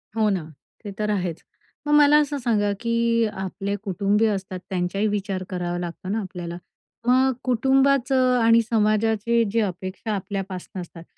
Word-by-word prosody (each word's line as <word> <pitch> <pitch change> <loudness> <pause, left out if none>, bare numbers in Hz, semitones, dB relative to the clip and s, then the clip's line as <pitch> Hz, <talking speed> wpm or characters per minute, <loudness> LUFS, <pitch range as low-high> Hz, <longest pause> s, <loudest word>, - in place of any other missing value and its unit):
हो 220 -1 +2
ना. 190 -5 -1 0.4
ते 205 - -6
तर 210 0 0
आहेच. 180 -5 -2 0.5
मग 295 - +2
मला 295 0 +7
असं 290 0 -2
सांगा, 215 -5 +1
की 230 0 +1 0.2
आपले 195 +1 -3
कुटुंबीय 205 +2 +1
असतात, 190 -2 -4
त्यांचाही 190 +3 -1
विचार 200 -2 -2
करावा 175 -1 -3
लागतो 175 +2 -6
ना, 220 - 0
आपल्याला. 175 -3 -6 0.5
मग 260 +1 +4
कुटुंबाचं 260 0 +3
आणि 230 0 +5
समाजाचे 225 0 +1
जे 230 - +1
अपेक्षा 185 +2 -4
आपल्यापासनं 190 -1 -5
असतात, 170 -1 -11
210 Hz, 145 wpm, -23 LUFS, 190-235 Hz, 0.5 s, मला